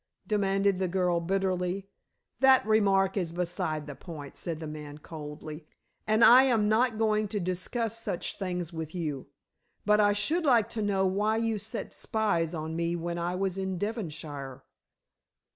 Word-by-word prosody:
demanded 195 -2 +1
the 190 - +1
girl 180 -1 +1
bitterly. 185 +1 -1 0.5
"That 265 -4 +6
remark 195 -3 +3
is 175 -4 -1
beside 165 -3 -2
the 145 - -7
point," 145 -2 -9
said 165 -3 -4
the 160 - -6
man 150 -1 -7
coldly. 150 0 -8 0.4
"And 215 +1 +5
I 250 +2 +9
am 225 -5 +2
not 225 +1 +2
going 215 -1 +2
to 205 0 -3
discuss 210 +6 -2
such 180 -3 -4
things 180 -3 -3
with 160 0 -6
you. 150 -6 -3 0.6
But 210 0 +4
I 205 -1 +5
should 320 +12 +1
like 235 -7 +4
to 225 - -2
know 195 -2 +1
why 205 +4 +1
you 225 -2 0
set 215 +3 -6
spies 180 -7 0
on 160 0 -4
me 170 +1 0
when 170 0 -3
I 175 +1 -1
was 195 0 -1
in 190 -1 -2
Devonshire?" 155 - -5
190 Hz, 160 wpm, -29 LUFS, 165-215 Hz, 0.6 s, I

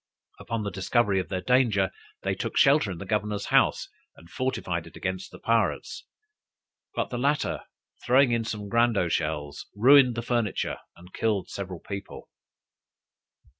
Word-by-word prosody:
Upon 115 -1 -3
the 100 - -3
discovery 100 +2 +1
of 90 - -4
their 95 -2 -2
danger, 115 -7 +3 0.3
they - - 0
took - - -4
shelter 140 -5 +5
in 90 - -5
the - - -7
governor's 105 -1 -1
house, - - +3 0.3
and 85 - -17
fortified 90 -10 -2
it - - -13
against 95 -1 -4
the - - -12
pirates: 115 0 -1 0.9
but - - -2
the 120 - -3
latter 145 +3 0 0.4
throwing 130 +1 +4
in 115 -1 +1
some 105 -2 -5
grando 115 -6 +2
shells, 75 -3 -2
ruined 125 +2 +6
the 115 - -3
furniture, 120 -4 -1 0.2
and 90 +2 -16
killed 105 -4 -1
several 95 -3 -6
people. 100 -1 -8
105 Hz, 150 wpm, -26 LUFS, 95-120 Hz, 0.9 s, ruined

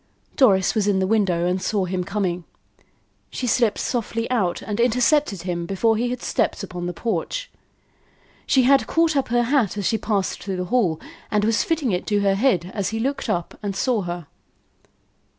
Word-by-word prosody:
Doris 195 - +4
was 210 -2 0
in 200 -2 +2
the 190 - +1
window 185 -5 +1
and 180 +1 0
saw 200 -2 0
him 180 0 -2
coming. 180 -3 -2 0.9
She 255 - -4
slipped 235 -2 +2
softly 230 -1 -2
out 190 -8 0
and 210 +1 -4
intercepted 245 - +2
him 170 -2 -3
before 220 +4 +2
he 240 +3 0
had 250 0 -4
stepped - - 0
upon 180 -2 -5
the - - -2
porch. 230 - -3 1.0
She 260 - +4
had 270 +2 +4
caught 330 -1 +2
up 275 - +1
her 240 +1 +2
hat 235 -6 +1
as 200 - -2
she 220 +5 +1
passed 200 -4 -1
through 195 -2 -4
the 180 - -2
hall, 180 -11 +2 0.3
and 210 -1 +1
was 225 0 +2
fitting 315 -8 0
it 180 - -2
to 205 -1 +1
her 200 -1 +3
head 195 - +1
as 200 -3 -1
he 225 - -3
looked 275 +5 -2
up 175 -1 -2
and 200 -2 -3
saw 235 +1 +1
her. 175 -2 -5
210 Hz, 190 wpm, -22 LUFS, 185-245 Hz, 1.0 s, Doris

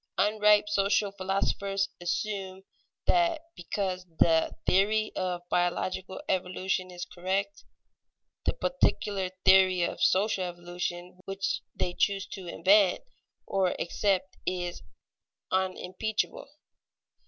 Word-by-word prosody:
Unripe 210 +1 +4
social 200 0 +2
philosophers 195 0 -1
assume 190 +1 -3 0.4
that 340 -2 +3 0.2
because 185 +1 -3
the 160 -1 +4
theory 215 +3 +3
of 180 -1 -3
biological 185 +1 -1
evolution 185 0 -1
is 180 -1 -6
correct, 195 +3 -3 0.8
the - - +2
particular 205 - 0 0.2
theory 185 -2 +6
of - - -3
social 195 0 +3
evolution 175 0 -5
which 195 0 -2
they 175 - -1
choose 200 +1 +1
to 190 -3 -9
invent 195 +2 +4 0.4
or 190 -2 0
accept 190 +1 0
is 175 -1 -3 0.7
unimpeachable. 190 +6 -2
190 Hz, 95 wpm, -29 LUFS, 180-200 Hz, 0.8 s, theory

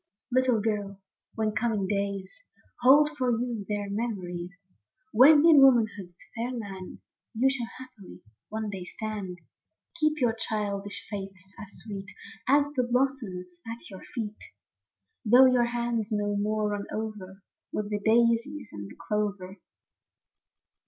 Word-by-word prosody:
Little 255 -2 +3
girl, 205 -2 -2 0.4
when 220 -1 0
coming 215 -2 0
days 200 - -3 0.4
Hold 290 +4 +6
for 255 -3 0
you 235 -3 -2
their 205 -1 -2
memories; 185 -4 -4 0.5
When 290 +7 +7
in 315 -4 +8
womanhood's 215 -9 +3 0.2
fair 235 +1 -2
land 200 -7 -7 0.3
You 250 +4 +3
shall, 245 -4 -3
haply, 255 -7 -12 0.3
one 215 -1 -3
day 190 -2 -5
stand, 205 -2 -5 0.3
— - - -22
Keep 310 0 +2
your 240 -4 +2
childish 205 -3 -3
faiths 195 -1 -8
as 200 - -9
sweet 195 -3 -7 0.4
As 285 +2 +5
the 255 - +3
blossoms 240 -9 -2
at 230 -2 -9
your 190 - -9
feet; 215 -3 -4 0.8
Though 245 +3 +7
your 250 -2 +4
hands 235 -2 -1
no 205 -1 0
more 210 +1 0
run 205 -1 -3
over 205 -3 -6 0.3
With 210 0 -3
the 205 - 0
daisies 235 +4 +2
and 100 -1 -7
the - - -12
clover. 205 -2 -2
215 Hz, 135 wpm, -28 LUFS, 200-245 Hz, 0.8 s, in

